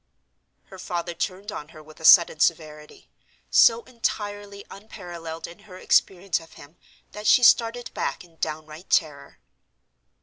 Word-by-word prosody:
Her 190 - -14
father 175 -1 -4
turned 185 +4 -5
on 150 - -8
her 155 -1 -14
with 155 0 -17
a 160 - -7
sudden 170 -2 +7
severity, 155 -2 -2 0.4
so 230 0 +5
entirely 205 -4 -5
unparalleled 175 -6 -9
in 170 - -12
her 200 -3 -14
experience 185 -1 +1
of 165 -1 -17
him 145 +4 -16 0.4
that 210 0 -6
she 250 - +5
started 240 0 +3
back 140 - -4
in 170 -2 -22
downright 155 +2 -6
terror. 140 -4 -1
175 Hz, 140 wpm, -24 LUFS, 155-205 Hz, 0.4 s, sudden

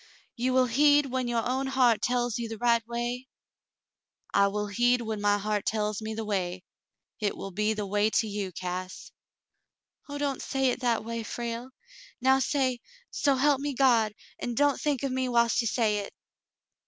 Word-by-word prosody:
*'You 250 +2 0
will 255 0 +4
heed 290 +4 +4
when 260 -1 -2
your 235 -1 0
own 265 +2 -1
heart 255 -4 +3
tells 245 -2 0
you 230 -1 -4
the 225 - -6
right 235 0 +3
way 240 +2 -3 0.7
?" - - -64 0.3
'*I 200 - +5
will 210 +1 -2
heed 240 +4 +2
when 220 -2 -4
my 205 0 +3
heart 205 0 -1
tells 215 -1 -1
me 220 0 -4
the 220 0 -4
way: 185 -3 -2 0.5
hit 210 -3 -2
will 195 - -6
be 210 +3 0
the 210 -1 -3
way 205 +2 +1
to 220 - +1
you, 200 -2 -3
Cass." 185 +1 -6 1.0
"Oh, 285 - -4
don't 285 -2 -2
say 270 -1 0
it - - -4
that 235 -3 0
way, 230 0 -3
Frale. 235 +2 -5 0.5
Now 265 +1 +4
say, 260 -3 0 0.3
*So 280 -2 +2
help 275 +1 +2
me 285 -1 -3
God,' 235 -5 +3 0.2
and 240 -2 -4
don't 290 -1 +2
think 290 -4 0
of 275 - -1
me 260 0 -1
whilst 235 0 +3
you 230 - -1
say 220 -3 +1
it." 200 - -7
235 Hz, 190 wpm, -28 LUFS, 210-260 Hz, 1.0 s, I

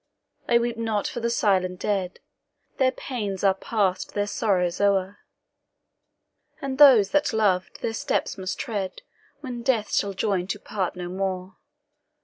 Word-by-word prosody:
"I 235 - +6
weep 235 0 -1
not 225 -3 -1
for - - -5
the 235 0 -1
silent 185 -5 +1
dead. 190 -3 -2 0.6
Their 260 -1 +4
pains 205 -10 -4
are 195 -1 +5
past, 195 -1 -1
their 205 0 +1
sorrows 185 -4 0
o'er; 200 -1 +1 1.4
And 275 -2 -4
those 250 -9 +8
that 295 0 +2
loved 195 -4 +1
their 225 - -1
steps 280 +4 -1
must 190 -1 -4
tread, 200 -5 -4 0.4
When 250 -4 -5
death 235 -4 0
shall 200 -1 +1
join 190 -2 -1
to 205 +2 -3
part 190 -4 -3
no 180 -1 -5
more." 185 0 -3
205 Hz, 145 wpm, -25 LUFS, 190-230 Hz, 1.4 s, those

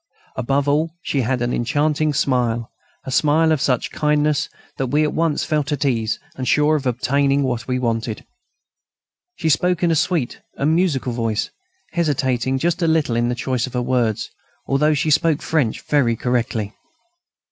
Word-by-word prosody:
Above 135 +3 0
all, 155 +3 +1
she 140 - 0
had 125 +1 0
an 120 - -1
enchanting 150 +4 +1
smile, 120 -5 0 0.3
a 130 - -5
smile 155 +4 +3
of 155 -4 +1
such 125 -3 0
kindness 150 -1 +1 0.3
that 135 - -1
we 145 +5 +2
at 150 - 0
once 160 -2 0
felt 150 -1 -1
at 145 0 -1
ease 115 -4 0 0.2
and 130 -1 -4
sure 150 +1 +3
of 140 -3 -2
obtaining 140 +3 +1
what 120 -3 -2
we 125 -1 0
wanted. 115 -2 -2 1.1
She 160 - -3
spoke 180 +3 +2
in 170 - +3
a - - +2
sweet 160 -5 0
and 150 +3 +1
musical 155 -8 +1
voice, 115 -2 -1 0.4
hesitating 135 -6 0
just 170 +5 0
a 165 - +2
little 160 -7 +1
in 120 +1 +1
her 125 - -1
choice 130 0 -1
of 130 - -9
words, 120 -3 0 0.3
although 150 +3 +2
she 155 +2 0
spoke 150 +1 +2
French 140 -9 0
very 130 -6 +2
correctly. 115 -3 -1
135 Hz, 170 wpm, -20 LUFS, 125-150 Hz, 1.1 s, smile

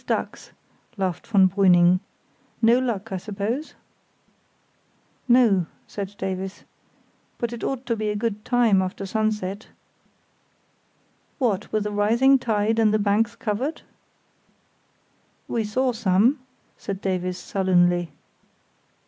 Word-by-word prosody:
"Always - - -32
ducks," - - -9 0.5
laughed 185 -3 -3
von 200 -4 +5
Brüning. 180 -2 +4 0.6
"No 235 +2 +4
luck, 225 -5 -3
I 190 - -2
suppose?" 210 - -4 1.5
"No," 230 -8 +4 0.2
said 200 0 -6
Davies; 190 0 -5 0.7
"but 235 0 -3
it 235 - -7
ought 265 -1 -3
to 235 -1 0
be 215 -1 -2
a 210 - -2
good 210 -1 -3
time 235 -6 +3
after 185 +1 -4
sunset——" 210 -1 -2 1.7
"What, 215 -7 -1
with 215 -1 0
a 210 - -2
rising 235 +7 +3
tide 220 -1 0
and 220 -2 +4
the 215 - +3
banks 215 +3 +1
covered?" 230 +8 -3 1.6
"We 230 - -1
saw 255 +5 0
some," 225 +4 +2 0.4
said 195 -2 -5
Davies, 185 -2 -2
sullenly. 175 -3 +1
210 Hz, 115 wpm, -24 LUFS, 190-230 Hz, 1.7 s, von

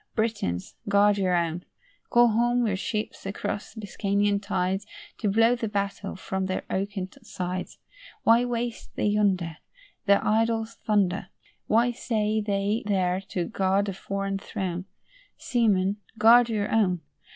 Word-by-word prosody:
Britons, 215 - -1 0.2
guard 200 0 +4
your 185 -2 +2
own. 170 0 -1 0.5
Call 240 0 +6
home 240 +2 +2
your 205 -4 +1
ships 210 +2 -3
across 205 +2 -4
Biscayan 205 -1 0
tides, 195 0 -1 0.3
To 210 - 0
blow 225 +4 +4
the 235 -2 -3
battle 200 -1 -3
from 190 0 -3
their 185 - -2
oaken 195 -1 -2
sides. 180 0 -5 0.5
Why 230 +2 +5
waste 240 -1 -4
they - - -1
yonder 195 -6 +1 0.5
Their 200 0 +4
idle 225 +1 +2
thunder? 205 -4 0 0.4
Why 235 +3 +3
stay 220 -3 0
they 205 +1 0
there 185 -2 +1
to 175 -2 -1
guard 195 +2 +1
a - - -3
foreign 195 +1 -3
throne? 185 -2 -4 0.5
Seamen, 205 -5 +1 0.2
guard 235 +2 +7
your 210 -2 -1
own. 185 -6 +2
205 Hz, 135 wpm, -26 LUFS, 190-225 Hz, 0.5 s, guard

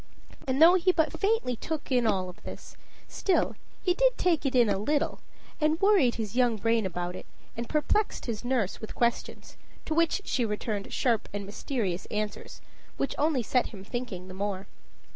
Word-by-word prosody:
And 260 +1 0
though 330 +3 +9
he 370 0 +4
but 325 -1 0
faintly 400 - +1
took 310 +4 -5
in 245 -3 +3
all 185 -3 0
this, - - -9 0.3
still 380 - +1 0.3
he 360 - +3
did - - +3
take 330 -5 +2
it 265 - -2
in 240 -2 +6
a 200 -2 +1
little, 290 +8 0 0.4
and 310 +1 +2
worried 390 - +4
his 220 -1 -4
young 245 -2 +3
brain 225 -1 +1
about 175 0 -4
it, - - -9 0.3
and 235 0 -5
perplexed 345 +7 0
his 230 -2 -4
nurse 245 -6 -1
with 220 - -7
questions, 235 -1 -2 0.3
to 315 - -1
which 335 +5 +2
she 250 - 0
returned 210 -1 -3
sharp 235 -4 +1
and 205 -1 -4
mysterious 200 -3 -3
answers, 210 0 -4 0.4
which 275 - -1
only 295 -5 +2
set 250 +3 +1
him 195 -4 -10
thinking 205 -5 -5
the 185 - -9
more. 195 0 -3
245 Hz, 180 wpm, -28 LUFS, 205-310 Hz, 0.4 s, though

